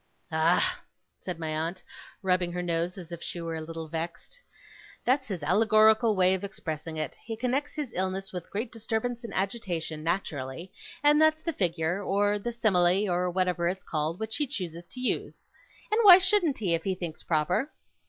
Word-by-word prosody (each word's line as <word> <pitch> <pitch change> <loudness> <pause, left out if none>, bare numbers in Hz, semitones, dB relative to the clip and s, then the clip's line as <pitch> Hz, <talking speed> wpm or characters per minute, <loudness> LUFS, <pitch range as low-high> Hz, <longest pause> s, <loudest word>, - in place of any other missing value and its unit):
'Ah!' 175 - +2 0.4
said 180 -3 -5
my 160 -1 -4
aunt, 160 +4 -3 0.4
rubbing 180 -2 +1
her 180 0 -2
nose 170 +1 -1
as 175 -2 -9
if 170 -1 -7
she 175 - -5
were 165 -1 -4
a - - -5
little 165 0 -6
vexed. 165 - -6 0.7
'That's 260 +1 +2
his 185 -7 -4
allegorical 215 +5 +4
way 185 0 +4
of 190 +1 -2
expressing 160 -5 -5
it. 155 -3 -3
He 225 -1 -5
connects 255 +5 -1
his 285 -7 -4
illness 190 +1 -2
with 180 -1 -6
great 220 +3 -3
disturbance 230 +1 -3
and 230 - -6
agitation, 180 -6 -2
naturally, 165 -2 -3 0.3
and 295 +1 +5
that's 315 0 +4
the 330 - -2
figure, 175 - 0
or 205 +1 +1
the 240 +4 -3
simile, 200 -4 +3
or 180 +1 +1
whatever 180 -1 0
it's 185 +2 -2
called, 155 +2 -2
which 220 0 -3
he 295 - 0
chooses 175 -6 -5
to 255 - -9
use. 250 - -2 0.4
And 430 - +3
why 385 -5 +11
shouldn't 370 -6 +2
he, 190 -6 0
if 165 -1 0
he 190 -1 -1
thinks 175 -3 -6
proper! 175 - 0
185 Hz, 185 wpm, -28 LUFS, 170-225 Hz, 0.7 s, why